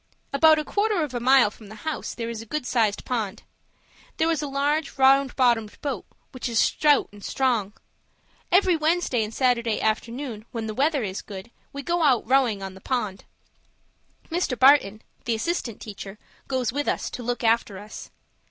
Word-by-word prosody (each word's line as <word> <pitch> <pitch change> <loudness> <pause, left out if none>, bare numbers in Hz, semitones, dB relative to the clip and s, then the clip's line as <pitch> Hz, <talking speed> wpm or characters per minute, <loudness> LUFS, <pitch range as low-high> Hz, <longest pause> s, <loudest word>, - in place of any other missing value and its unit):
About 315 +2 +6
a 305 - -1
quarter 410 -2 +1
of 290 -4 -5
a 245 - -2
mile 255 -3 +5
from 215 -1 -15
the 215 - -11
house 315 - -3
there 230 -1 -4
is 225 -1 -6
a 225 - -12
good 300 +2 -3
sized 225 -5 0
pond. 220 -6 -3 0.7
There 325 +1 +2
is 315 -2 0
a 295 - -3
large, 285 +3 -1
round 270 0 +4
bottomed 235 -5 +1
boat, 285 - -3 0.3
which 255 -2 -4
is 230 - -2
stout 295 +4 +3
and 205 -1 -14
strong. 235 -7 0 0.8
Every 365 0 +4
Wednesday 315 -6 +1
and 210 - -5
Saturday 235 -3 +1
afternoon, 230 +1 -2
when 230 -3 -4
the 215 - -4
weather 280 +2 +1
is 190 -2 -4
good, 200 +2 -10 0.2
we 280 0 -7
go 345 +2 0
out 265 -8 +3
rowing 245 -6 +2
on 190 -1 -6
the 190 - -14
pond. 215 -6 -3 1.1
Mr. 330 -7 -1
Barton, 260 -6 +5 0.2
the 235 - +1
assistant 235 -2 -3
teacher, 200 -1 -8 0.3
goes 255 -3 -1
with 290 +1 -2
us, - - -1
to - - -6
look 245 +1 -3
after 225 -3 +2
us. 210 +2 -10
250 Hz, 180 wpm, -25 LUFS, 220-285 Hz, 1.1 s, About